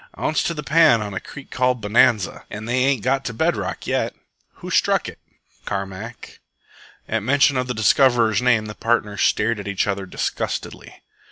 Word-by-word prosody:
"Ounce 155 Hz, -, 0 dB
to 170 Hz, -, -2 dB
the 150 Hz, -, -5 dB
pan 155 Hz, -4 st, +5 dB
on 105 Hz, -2 st, -5 dB
a 95 Hz, -, -3 dB
creek 140 Hz, -, -12 dB
called 125 Hz, -1 st, +1 dB
Bonanza, 110 Hz, -1 st, +2 dB
an' 110 Hz, +1 st, -7 dB
they 125 Hz, +2 st, +1 dB
ain't 135 Hz, -6 st, +1 dB
got 135 Hz, +1 st, +1 dB
to 120 Hz, -, -4 dB
bed 160 Hz, +6 st, +1 dB
rock 95 Hz, -2 st, -5 dB
yet." -, -, -1 dB, 0.4 s
"Who -, -, -9 dB
struck -, -, +2 dB
it?" -, -, -9 dB, 0.5 s
"Carmack." 100 Hz, +4 st, -6 dB, 0.7 s
At 115 Hz, 0 st, -1 dB
mention 135 Hz, +4 st, +3 dB
of 125 Hz, 0 st, -1 dB
the 125 Hz, -, -3 dB
discoverer's 115 Hz, 0 st, +3 dB
name 120 Hz, -3 st, +2 dB
the 105 Hz, -, -7 dB
partners 105 Hz, -3 st, -1 dB
stared 110 Hz, +1 st, +1 dB
at 100 Hz, -, -7 dB
each 100 Hz, -1 st, 0 dB
other 100 Hz, -1 st, -3 dB
disgustedly. -, -, -5 dB
115 Hz, 180 wpm, -21 LUFS, 105-130 Hz, 0.7 s, pan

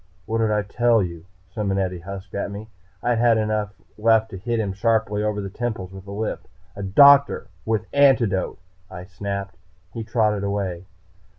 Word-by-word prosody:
"What 115 Hz, +1 st, -1 dB
did 110 Hz, -1 st, +2 dB
I 105 Hz, -1 st, +1 dB
tell 115 Hz, +1 st, +2 dB
you?" 85 Hz, -1 st, -7 dB, 0.3 s
Simonetti 95 Hz, -4 st, -1 dB
husked 95 Hz, +2 st, -9 dB
at 100 Hz, -, -2 dB
me. 105 Hz, +2 st, -8 dB, 0.3 s
I 120 Hz, -, +2 dB
had 115 Hz, -1 st, +3 dB
enough 105 Hz, -2 st, -1 dB, 0.2 s
left 110 Hz, 0 st, +3 dB
to 95 Hz, -, -6 dB
hit 115 Hz, +3 st, -1 dB
him 100 Hz, -3 st, -1 dB
sharply 105 Hz, 0 st, +1 dB
over 105 Hz, -1 st, -1 dB
the 100 Hz, -, -5 dB
temples 110 Hz, -5 st, -4 dB
with 95 Hz, 0 st, -11 dB
a -, -, -7 dB
lift. 105 Hz, +2 st, -4 dB, 0.3 s
"A 100 Hz, -, -6 dB
doctor. 140 Hz, +7 st, +5 dB, 0.2 s
With 110 Hz, -1 st, 0 dB
antidote," 130 Hz, -9 st, +3 dB, 0.3 s
I 90 Hz, -1 st, -8 dB
snapped. 100 Hz, -1 st, -5 dB, 0.4 s
He 115 Hz, -, -4 dB
trotted 110 Hz, -3 st, +1 dB
away. 95 Hz, -3 st, -3 dB
105 Hz, 170 wpm, -23 LUFS, 100-115 Hz, 0.4 s, doctor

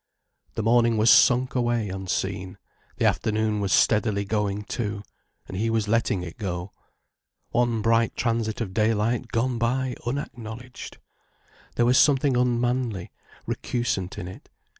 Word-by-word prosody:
The 110 Hz, -, -2 dB
morning 115 Hz, 0 st, +3 dB
was 110 Hz, +1 st, +5 dB
sunk 125 Hz, +1 st, +5 dB
away 120 Hz, -4 st, 0 dB
unseen, 95 Hz, 0 st, -3 dB, 0.4 s
the -, -, +1 dB
afternoon 110 Hz, -1 st, +1 dB
was 100 Hz, -2 st, -1 dB
steadily 105 Hz, -2 st, +3 dB
going 105 Hz, 0 st, -1 dB
too, 105 Hz, -2 st, -4 dB, 0.4 s
and -, -, -7 dB
he 110 Hz, +4 st, 0 dB
was 110 Hz, -2 st, 0 dB
letting 105 Hz, -4 st, +1 dB
it 85 Hz, -2 st, -9 dB
go. 90 Hz, -2 st, -4 dB, 0.8 s
One 120 Hz, -2 st, +1 dB
bright 115 Hz, 0 st, +2 dB
transit 115 Hz, -2 st, -1 dB
of 95 Hz, -5 st, -4 dB
daylight 110 Hz, +3 st, +1 dB
gone 115 Hz, +1 st, -1 dB
by 125 Hz, +2 st, 0 dB
unacknowledged! 120 Hz, -1 st, -6 dB, 0.8 s
There 120 Hz, -, +3 dB
was 125 Hz, +1 st, +5 dB
something 140 Hz, -2 st, +4 dB
unmanly, 120 Hz, -4 st, 0 dB, 0.3 s
recusant 100 Hz, -7 st, -2 dB
in 90 Hz, -, -5 dB
it. 95 Hz, -, -11 dB
115 Hz, 135 wpm, -25 LUFS, 105-120 Hz, 0.8 s, was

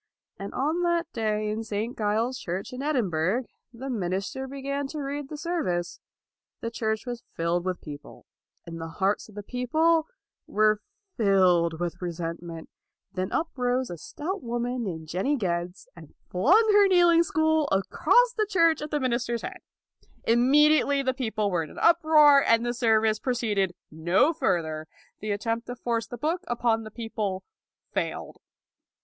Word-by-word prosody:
And 195 Hz, +1 st, -6 dB
on 310 Hz, +6 st, 0 dB
that 345 Hz, -1 st, 0 dB
day 215 Hz, -2 st, -1 dB
in 220 Hz, +1 st, -3 dB
St. 220 Hz, +2 st, -3 dB
Giles's 225 Hz, +4 st, -1 dB
Church 185 Hz, +6 st, -4 dB
in 250 Hz, -, -5 dB
Edinburgh, 225 Hz, -, 0 dB, 0.3 s
the 250 Hz, +3 st, -8 dB
minister 200 Hz, +3 st, -3 dB
began 280 Hz, +1 st, -3 dB
to 305 Hz, +2 st, -6 dB
read 285 Hz, 0 st, -4 dB
the 300 Hz, -, -6 dB
service. 290 Hz, -, -2 dB, 0.6 s
The 230 Hz, -, -4 dB
church 220 Hz, -1 st, -2 dB
was 240 Hz, -2 st, -5 dB
filled 170 Hz, +1 st, 0 dB
with 185 Hz, -1 st, -2 dB
people, 145 Hz, -1 st, -10 dB, 0.4 s
and 165 Hz, -1 st, -7 dB
the 165 Hz, -, -4 dB
hearts 195 Hz, +6 st, -1 dB
of 210 Hz, -, -16 dB
the 205 Hz, -, -6 dB
people 310 Hz, +8 st, +1 dB, 0.4 s
were 215 Hz, 0 st, +2 dB, 0.4 s
filled 180 Hz, -6 st, +3 dB
with 175 Hz, 0 st, -3 dB
resentment. 170 Hz, -1 st, -5 dB, 0.5 s
Then 185 Hz, 0 st, -3 dB
up 320 Hz, -, 0 dB
rose 250 Hz, -1 st, 0 dB
a 175 Hz, -, -6 dB
stout 350 Hz, -, -5 dB
woman 240 Hz, +1 st, -2 dB
named 160 Hz, -4 st, -5 dB
Jenny 190 Hz, -, 0 dB
Geddes, 175 Hz, -5 st, -3 dB
and 160 Hz, -3 st, -14 dB, 0.2 s
flung 360 Hz, -, +4 dB
her 410 Hz, -1 st, +6 dB
kneel 355 Hz, -2 st, +5 dB
ing 335 Hz, 0 st, +6 dB
stool 315 Hz, -2 st, +1 dB
across 470 Hz, -, +3 dB
the 430 Hz, -2 st, 0 dB
church 335 Hz, -5 st, +3 dB
at 300 Hz, -, -5 dB
the 295 Hz, -, 0 dB
min 255 Hz, -3 st, 0 dB
ister's 235 Hz, -1 st, -2 dB
head. -, -, -6 dB, 0.6 s
Immediately 280 Hz, +4 st, +4 dB
the 260 Hz, -1 st, +1 dB
people 220 Hz, -6 st, -1 dB
were 175 Hz, -2 st, +1 dB
in 155 Hz, -, -6 dB
an -, -, -10 dB
uproar 310 Hz, -4 st, +6 dB
and 230 Hz, +1 st, +3 dB
the 240 Hz, -, 0 dB
service 220 Hz, -3 st, +2 dB
proceeded 210 Hz, -8 st, 0 dB, 0.2 s
no 175 Hz, -, +2 dB
further. 160 Hz, -, -1 dB, 0.3 s
The 215 Hz, -, -5 dB
attempt 225 Hz, +3 st, -2 dB
to 245 Hz, -, -5 dB
force 230 Hz, -2 st, -2 dB
the 245 Hz, -, -7 dB
book 320 Hz, +8 st, -1 dB
upon 235 Hz, -2 st, 0 dB
the -, -, -7 dB
people 215 Hz, -4 st, -4 dB, 0.5 s
failed. -, -, -3 dB
230 Hz, 165 wpm, -26 LUFS, 190-285 Hz, 0.6 s, her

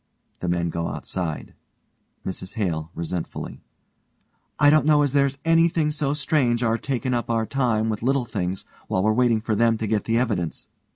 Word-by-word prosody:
(The 90 Hz, -, -2 dB
men 85 Hz, -1 st, 0 dB
go 85 Hz, 0 st, -2 dB
outside.) 85 Hz, -5 st, -4 dB, 0.7 s
MRS 95 Hz, +1 st, -5 dB
HALE: 80 Hz, -8 st, -2 dB
(resentfully) 85 Hz, +1 st, -5 dB, 1.0 s
I 145 Hz, 0 st, +6 dB
don't 155 Hz, -1 st, +4 dB
know 150 Hz, -1 st, +5 dB
as 140 Hz, -2 st, 0 dB
there's 140 Hz, -1 st, +2 dB
anything 165 Hz, -1 st, +3 dB
so 145 Hz, -1 st, 0 dB
strange, 135 Hz, -5 st, +1 dB
our 115 Hz, 0 st, +1 dB
takin' 130 Hz, -1 st, -2 dB
up 120 Hz, -1 st, -1 dB
our 115 Hz, -1 st, +1 dB
time 115 Hz, -4 st, 0 dB
with 110 Hz, -2 st, -2 dB
little 130 Hz, +1 st, +1 dB
things 95 Hz, -4 st, -3 dB, 0.2 s
while 95 Hz, -, 0 dB
we're 110 Hz, +1 st, +3 dB
waiting 120 Hz, -2 st, +3 dB
for 110 Hz, 0 st, -1 dB
them 115 Hz, +1 st, +3 dB
to 110 Hz, -, -3 dB
get 105 Hz, -1 st, 0 dB
the 115 Hz, 0 st, +1 dB
evidence. 105 Hz, -9 st, -2 dB
115 Hz, 175 wpm, -24 LUFS, 95-140 Hz, 1.0 s, I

